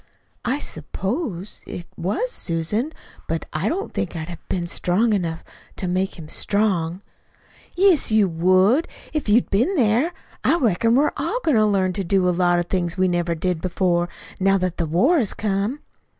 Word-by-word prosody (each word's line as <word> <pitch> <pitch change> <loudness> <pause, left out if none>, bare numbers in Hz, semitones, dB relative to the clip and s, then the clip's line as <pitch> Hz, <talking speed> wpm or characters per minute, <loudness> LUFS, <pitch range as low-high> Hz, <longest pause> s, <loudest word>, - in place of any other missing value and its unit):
"I 255 +3 +1
suppose 195 - -4
it 175 - -6
was, 390 - -1
Susan; 200 - -1 0.4
but - - -2
I - - 0
don't 390 +4 -3
think 180 - -3
I'd 160 0 -5
have 170 -2 -10
been 175 -2 -1
strong 190 +6 +1
enough 170 -5 -2 0.3
to 185 - -4
make 185 +2 -1
him 160 -3 -9
strong." 190 -1 0 0.7
"Yes, 365 - +4
you 215 -2 +4
would, 185 - +3 0.3
if 305 -8 -2
you'd 230 +4 +3
been 245 - +2
there. 245 +4 +2 0.3
I - - +4
reckon 230 - +2
we're 290 +3 +3
all - - -1
goin' 315 - +2
to 215 -1 +4
learn 190 -3 +1
to 195 - -2
do 185 +1 +2
a - - +4
lot 175 0 +2
of 175 - 0
things 175 -1 -2
we 185 0 +3
never 175 -1 0
did 175 0 -1
before, 175 -1 +1 0.3
now 195 +1 +4
that 185 -2 -2
the 170 - -1
war 255 - +3
has 220 -7 -1
come." 210 +6 -1
190 Hz, 180 wpm, -22 LUFS, 175-230 Hz, 0.7 s, Yes